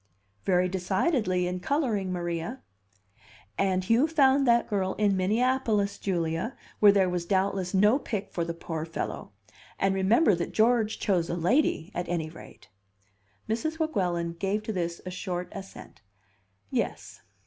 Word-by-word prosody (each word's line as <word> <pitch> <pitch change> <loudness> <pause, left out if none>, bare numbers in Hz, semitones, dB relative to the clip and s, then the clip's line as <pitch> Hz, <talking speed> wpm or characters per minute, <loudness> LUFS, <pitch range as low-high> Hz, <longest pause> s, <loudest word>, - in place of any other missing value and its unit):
"Very 180 -1 +3
decidedly, 190 - 0
in 180 +1 -2
coloring, 215 - 0
Maria." 175 +7 -4 0.9
"And 185 -1 +1
Hugh 230 +9 +3
found 275 -4 +4
that 235 0 +4
girl 190 -3 -1
in 205 -2 +2
Minneapolis, 215 +1 +1
Julia, 170 +5 -2 0.2
where 205 -1 +8
there 195 -2 +3
was 180 -1 -1
doubtless 190 -1 0
no 210 +7 +4
pick 210 -7 -4
for 170 - -1
the 170 0 -4
poor 165 -2 -5
fellow. 165 +1 -5 0.5
And 195 0 +1
remember 205 +7 +4
that 170 -1 -3
George 220 -1 +2
chose 180 -5 +1
a - - -1
lady, 180 - +1
at 175 0 -4
any 160 -3 -2
rate." 165 - -14 0.8
Mrs. 275 +9 -2
Weguelin 180 - -1
gave 200 +3 -1
to 220 - -3
this 170 -2 -3
a 185 - -5
short 180 -1 -4
assent. 195 -1 -10 0.7
"Yes." - - -3
195 Hz, 145 wpm, -27 LUFS, 180-225 Hz, 0.9 s, where